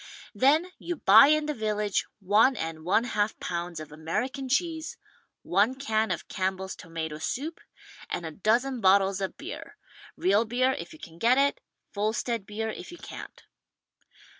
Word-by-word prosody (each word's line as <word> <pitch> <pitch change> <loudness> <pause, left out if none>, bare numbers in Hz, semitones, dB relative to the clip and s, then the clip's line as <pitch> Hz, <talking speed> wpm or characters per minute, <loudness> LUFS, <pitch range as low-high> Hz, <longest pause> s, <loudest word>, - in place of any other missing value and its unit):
Then 295 - +3
you 345 - -3
buy 225 -1 +8
in 305 0 +3
the 300 - -1
village 210 -4 -1
one 210 +7 +4
and 160 -4 -5
one 190 +7 +3
half 215 -3 -1
pounds 170 -1 -4
of 155 -1 -9
American 245 - -3
cheese, 320 +3 -1 0.5
one 205 +8 +2
can 220 -5 0
of - - -3
Campbell's 190 0 -2
Tomato 160 -2 -6
Soup 280 - -3 0.5
and 175 - -3
a 160 - -4
dozen 235 - +1
bottles 195 0 +4
of 190 - -3
beer - - -8 0.2
— - - -19
real 200 +4 +3
beer, 250 +3 +1
if - - -6
you 315 - -12
can 165 - -12
get 240 +5 +4
it, 280 - +2 0.3
Volstead 215 +1 -1
beer 220 +1 -3
if - - -9
you 350 - -10
can't. - - -10
215 Hz, 165 wpm, -27 LUFS, 190-265 Hz, 0.5 s, buy